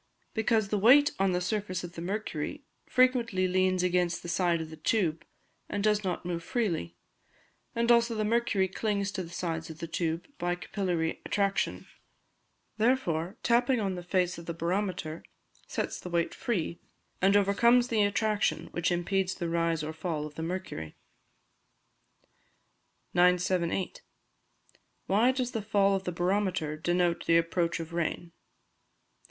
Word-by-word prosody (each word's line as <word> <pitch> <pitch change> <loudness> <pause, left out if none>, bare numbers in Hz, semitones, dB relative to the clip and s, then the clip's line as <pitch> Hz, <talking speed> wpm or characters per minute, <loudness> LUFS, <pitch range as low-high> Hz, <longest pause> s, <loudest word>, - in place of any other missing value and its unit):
_ - - -41
Because 220 -2 +1
the 210 - 0
weight 275 +8 +7
on 195 -1 +3
the 180 - +1
surface 185 -1 -2
of 175 0 -7
the 165 - -7
mercury 205 - -4 0.2
frequently 240 -7 +3
leans 185 0 +2
against 180 -1 +1
the 175 - -6
side 170 0 +2
of 160 -1 -6
the - - -7
tube, 165 -1 0 0.5
and 205 - -2
does 210 0 +2
not 180 -2 -3
move 170 -1 -3
freely. 170 - -2 0.8
And, 235 +1 +3
also, 235 -1 +4
the 215 -1 0
mercury 215 -4 +2
clings 200 0 -1
to 190 - -3
the 170 - -7
sides 165 -2 -3
of 160 - -8
the 165 - -5
tube 165 0 -2
by 175 0 0
capillary 175 -3 -2
attraction; 200 -1 0 0.9
therefore, 210 -6 +1
tapping 245 +1 +3
on 195 -3 -1
the 180 - -5
face 180 0 0
of 170 - -11
the 170 - -3
barometer 170 -2 -2 0.5
sets - - -3
the 180 - -7
weight 170 -1 0
free, 175 -7 -2 0.4
and 195 +2 +5
overcomes 235 +5 +4
the 225 -2 +2
attraction 205 +1 +1
which 175 0 0
impedes 185 +2 0
the 170 -3 -3
rise 165 -1 0
or 155 +1 -4
fall 160 -1 -3
of 150 - -8
the 160 - -6
mercury. 165 - -5 2.2
978. 180 - +2 1.1
_Why 220 +6 +4
does 255 -2 -2
the 225 - -2
Fall 200 -1 +2
of 190 0 -3
the 180 - -1
Barometer 175 -3 0
denote 175 +2 0
the 165 - +6
Approach 170 0 0
of 165 0 -7
Rain? 170 0 -2
185 Hz, 155 wpm, -29 LUFS, 170-210 Hz, 2.2 s, weight